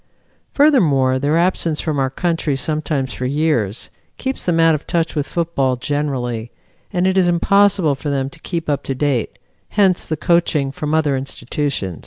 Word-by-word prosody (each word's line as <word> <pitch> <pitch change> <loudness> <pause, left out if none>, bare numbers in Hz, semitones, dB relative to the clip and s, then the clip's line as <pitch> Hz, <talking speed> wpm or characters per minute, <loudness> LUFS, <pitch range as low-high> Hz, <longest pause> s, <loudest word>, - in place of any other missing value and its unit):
Furthermore, 150 - +4
their 145 +4 +1
absence 170 -3 +1
from 155 -3 -1
our 135 -1 +1
country 165 0 -1
sometimes 150 -2 -2
for 125 - -3
years, 135 -8 -1 0.3
keeps 265 0 -3
them 170 -2 +2
out 165 0 +5
of 150 - -4
touch 165 -2 0
with 145 -2 -2
football 160 -7 0
generally, 125 -4 -2 0.4
and 180 -2 0
it 190 0 +3
is 180 - +3
impossible 185 -1 +3
for 140 +2 -5
them 135 -2 -1
to 150 +4 -12
keep 165 0 -4
up 145 -2 0
to 135 - -2
date 135 -4 -1 0.4
hence 190 -3 +3
the 155 - -2
coaching 165 -5 +1
from 150 +2 -2
other 150 -3 +2
institutions. 135 - -3
150 Hz, 170 wpm, -19 LUFS, 135-170 Hz, 0.4 s, out